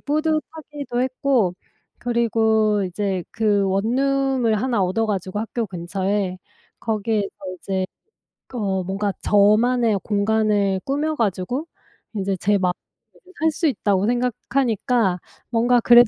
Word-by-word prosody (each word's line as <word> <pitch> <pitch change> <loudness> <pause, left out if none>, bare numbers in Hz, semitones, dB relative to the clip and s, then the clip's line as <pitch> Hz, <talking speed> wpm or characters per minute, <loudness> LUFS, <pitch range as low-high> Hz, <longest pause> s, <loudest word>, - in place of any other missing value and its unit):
뿌듯하기도 305 -3 -2
했고 255 -6 +1 0.4
그리고 220 -3 +2
이제 190 0 -2
그 210 -2 +2
원룸을 250 +2 +1
하나 240 -5 +1
얻어 205 +5 +1
가지고 195 -1 -2
학교 225 +1 -2
근처에 185 +1 -2 0.4
거기에서 215 -2 0 0.3
이제 190 0 -2 0.7
어 195 -5 -1
뭔가 195 +2 -1
저만의 215 +2 +4
공간을 205 -2 +1
꾸며 300 +3 0
가지고 225 - -1 0.5
이제 195 -1 -1
제 205 +3 +2
마음대로 180 -2 +1 0.7
살 320 0 +3
수 320 +2 0
있다고 200 -6 +1
생각하니까 240 -4 +1 0.3
뭔가 240 +1 +3
그래도 240 +1 +7
220 Hz, 260 characters per minute, -22 LUFS, 195-245 Hz, 0.7 s, 그래도